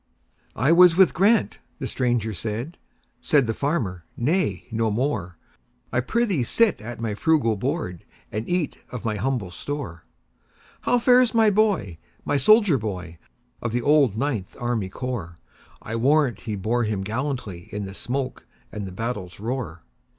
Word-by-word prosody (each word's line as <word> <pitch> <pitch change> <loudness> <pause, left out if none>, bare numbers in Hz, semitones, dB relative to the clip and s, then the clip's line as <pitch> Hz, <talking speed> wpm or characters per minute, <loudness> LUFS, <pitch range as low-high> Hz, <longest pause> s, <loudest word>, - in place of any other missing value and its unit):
"I 135 +8 +2
was 175 0 +7
with 190 -2 +6
Grant"—the 195 - +1
stranger 120 -4 0
said; 115 - -4 0.4
Said 145 -6 +3
the 115 - -1
farmer, 110 - -2
"Nay, 125 - 0
no 115 0 +1
more,—I 105 - -4
prithee 195 - +1
sit 215 - +2
at 120 +1 -7
my 115 -2 -2
frugal 135 -2 +2
board, 125 - -3 0.3
And 110 +1 -4
eat 175 -4 -1
of 125 -2 -7
my 110 -2 -1
humble 115 -4 -1
store."How 85 - -5
fares 245 0 +4
my 220 -2 +5
boy,—my 145 - 0
soldier 200 - +5
boy, 90 -6 -5 0.4
Of 120 -2 -3
the 120 0 0
old 140 -7 +4
Ninth 120 -7 -2
Army 120 -5 -1
Corps?I 115 -1 -7
warrant 130 -1 +2
he 110 -2 -4
bore 110 +5 0
him 105 -3 -1
gallantlyIn 105 -5 -4
the 95 - -7
smoke 130 +5 -4 0.2
and 105 -2 -5
the - - -7
battle's 105 -3 -5
roar!" 110 -7 -4
120 Hz, 135 wpm, -24 LUFS, 105-150 Hz, 0.4 s, was